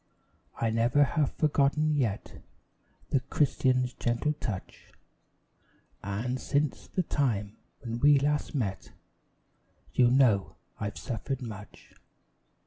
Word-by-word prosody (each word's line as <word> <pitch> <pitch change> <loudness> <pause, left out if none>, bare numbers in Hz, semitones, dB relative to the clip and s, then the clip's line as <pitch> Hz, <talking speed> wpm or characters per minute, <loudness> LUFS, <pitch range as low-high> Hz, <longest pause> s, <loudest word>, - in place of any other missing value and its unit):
I 115 -1 +1
never 120 +6 +3
have 145 0 0
forgotten 150 0 +2
yet 115 -8 -2 0.7
The 135 - +3
Christian's 130 -2 +1
gentle 120 +6 0
touch; 110 -10 -7 1.1
And, 110 +6 -3
since 145 -1 -1
the 185 - -1
time 110 -10 -1 0.2
when 115 -2 -4 0.2
last 145 +2 0
we - - +1
met, 95 -4 -5 1.0
You 125 -1 +5
know 120 -7 +3 0.2
I've 105 0 -4
suffered 130 +2 -4
much. 105 -3 -10
125 Hz, 105 wpm, -29 LUFS, 110-145 Hz, 1.1 s, You